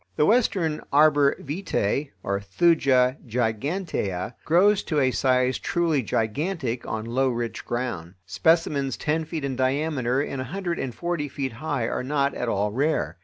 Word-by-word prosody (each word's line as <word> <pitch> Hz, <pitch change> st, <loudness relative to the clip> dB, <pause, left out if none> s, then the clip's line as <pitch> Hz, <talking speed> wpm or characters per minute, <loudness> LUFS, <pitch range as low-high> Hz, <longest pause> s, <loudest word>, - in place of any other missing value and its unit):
The 150 Hz, -, +3 dB
Western 190 Hz, -8 st, +2 dB
arbor 145 Hz, -1 st, +5 dB
vitæ 145 Hz, -, -2 dB, 0.2 s
(Thuja 125 Hz, -, +2 dB
gigantea) 115 Hz, -, -2 dB
grows 195 Hz, +5 st, +4 dB
to 155 Hz, -4 st, 0 dB
a 130 Hz, -2 st, +3 dB
size 130 Hz, -1 st, +2 dB
truly 165 Hz, -5 st, +1 dB
gigantic 125 Hz, -, -2 dB
on 110 Hz, 0 st, -3 dB
low 130 Hz, +3 st, +1 dB
rich 120 Hz, -1 st, -3 dB
ground. 120 Hz, -8 st, -4 dB
Specimens 140 Hz, -, +1 dB
ten 160 Hz, +2 st, -1 dB
feet 155 Hz, -2 st, -4 dB
in 135 Hz, -2 st, -2 dB
diameter 130 Hz, -1 st, 0 dB
and 140 Hz, -2 st, -2 dB
a -, -, -4 dB
hundred 175 Hz, +3 st, -3 dB
and 125 Hz, -3 st, -4 dB
forty 170 Hz, -4 st, -2 dB
feet 135 Hz, -1 st, -3 dB
high 120 Hz, -1 st, -2 dB
are -, -, -2 dB
not 140 Hz, +1 st, 0 dB
at 125 Hz, -, -3 dB
all 105 Hz, 0 st, 0 dB
rare. 115 Hz, -, -1 dB
135 Hz, 150 wpm, -25 LUFS, 120-160 Hz, 0.2 s, arbor